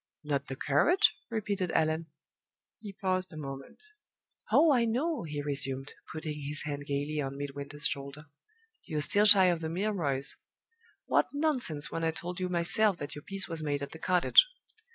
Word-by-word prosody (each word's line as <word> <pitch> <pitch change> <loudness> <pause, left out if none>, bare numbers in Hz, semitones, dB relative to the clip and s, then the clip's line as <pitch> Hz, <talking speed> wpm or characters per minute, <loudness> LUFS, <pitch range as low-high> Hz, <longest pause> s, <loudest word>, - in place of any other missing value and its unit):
"Not 145 -2 -2
the 135 - -5
courage?" 335 - +3
repeated 205 -5 -2
Allan. 160 +1 +1 0.7
He 205 -2 -8
paused 185 -1 -1
a 155 - -9
moment. 135 - -8 0.7
"Oh, 320 -2 +6
I 245 -3 +3
know!" 270 +8 0
he 150 -3 -4
resumed, 135 -1 -2 0.2
putting 155 -1 -5
his 145 +1 -3
hand 145 -1 -5
gayly 145 +2 -1
on 135 0 -4
Midwinter's 145 +1 -6
shoulder. 140 +1 -3 0.6
"You're 155 -3 -3
still 205 +8 +3
shy 195 -2 +8
of 175 -2 +2
the 160 - -3
Milroys. 165 -7 -1 0.7
What - - +3
nonsense, 260 - 0
when 165 - -3
I 165 - +2
told 180 +2 -4
you 185 0 -2
myself 180 +3 +3
that 145 -2 -6
your 150 - -8
peace 195 +4 -3
was 165 -2 -5
made 145 -2 -1
at 140 - -6
the 160 - -10
cottage!" 180 - +5
160 Hz, 170 wpm, -30 LUFS, 145-195 Hz, 0.7 s, shy